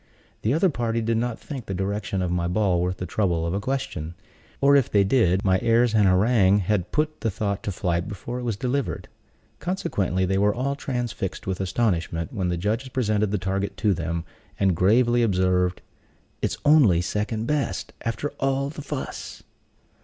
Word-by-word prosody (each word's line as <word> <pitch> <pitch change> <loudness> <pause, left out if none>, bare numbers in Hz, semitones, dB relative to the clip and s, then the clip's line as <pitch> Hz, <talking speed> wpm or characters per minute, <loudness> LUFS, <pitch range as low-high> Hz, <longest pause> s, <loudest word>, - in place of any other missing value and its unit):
The 110 - +1
other 175 +2 +3
party 115 -3 -1
did 115 0 0
not 120 0 -2
think 135 -6 -7
the 95 - -3
direction 95 0 -2
of 90 - -1
my 85 -1 0
ball 90 -1 +1
worth 90 +1 -1
the 90 - -4
trouble 90 -5 0
of 85 - -2
a 100 - 0
question; 105 - -3 0.4
or 140 +1 +5
if 135 -4 +3
they 100 -1 +4
did, 95 -4 +2
my 95 -1 +3
airs 115 0 +3
and 105 -3 +4
harangue 100 +1 +4
had 95 -2 0
put 155 +1 -1
the 115 - +1
thought 100 0 -2
to 100 - -3
flight 85 -1 -1
before 115 +5 -5
it - - -5
was 115 -4 -2
delivered. 130 +4 -2 0.5
Consequently, 100 - -1
they 95 +1 +1
were 105 +1 +3
all 135 +3 -1
transfixed 120 -8 -4
with 95 0 -2
astonishment 90 -5 -1
when 95 -4 -1
the 90 - -1
judges 110 +9 -1
presented 105 -5 0
the 105 - 0
target 95 +1 -2
to 105 -3 +2
them, 85 -1 -3 0.3
and 95 -3 +3
gravely 120 +7 +3
observed, 90 -4 +1 0.6
"It's - - -1
only 135 - +6
second 105 +5 -2
best, 145 +2 -2
after 115 +5 -2
all 135 +1 0
the 150 - -8
fuss." 140 -1 -6
105 Hz, 185 wpm, -24 LUFS, 95-120 Hz, 0.6 s, only